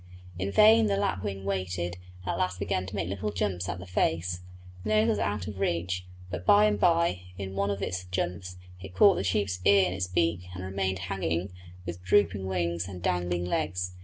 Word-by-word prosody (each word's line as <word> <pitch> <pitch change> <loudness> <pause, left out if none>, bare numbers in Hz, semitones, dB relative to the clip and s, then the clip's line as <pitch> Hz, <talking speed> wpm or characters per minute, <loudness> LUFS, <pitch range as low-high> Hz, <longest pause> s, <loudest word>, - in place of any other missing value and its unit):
In 95 +1 -1
vain 220 - +6
the 200 -1 +1
lapwing 100 - -2
waited, 90 -2 -2 0.3
and - - -2
at - - -2
last 90 0 0
began 95 -1 -1
to 100 - -7
make 95 -4 -1
little 100 +3 -3
jumps 95 -3 -2
at 85 - -3
the 90 - -8
face. 90 -1 0 0.4
The 105 - -4
nose 110 +1 +4
was 105 -2 +1
out 100 -3 -1
of 100 -1 -6
reach, 90 0 -1 0.2
but 90 -1 -4
by 205 - +6
and 210 0 +2
by, 170 - +3 0.2
in 95 -1 -5
one 100 +1 0
of 100 0 -2
its 90 0 -3
jumps, 90 0 -3 0.2
it 95 -1 -10
caught 200 -2 +7
the - - -1
sheep's 95 0 0
ear 100 -1 +6
in 90 - -1
its 95 -1 -2
beak 85 0 0
and 90 - -6
remained 95 0 -1 0.2
hanging 90 0 -1 0.3
with 85 0 -6
drooping 100 +1 +2
wings 85 -1 -1
and 90 -3 -8
dangling 90 0 0
legs. 90 0 -1
95 Hz, 205 wpm, -28 LUFS, 90-100 Hz, 0.4 s, caught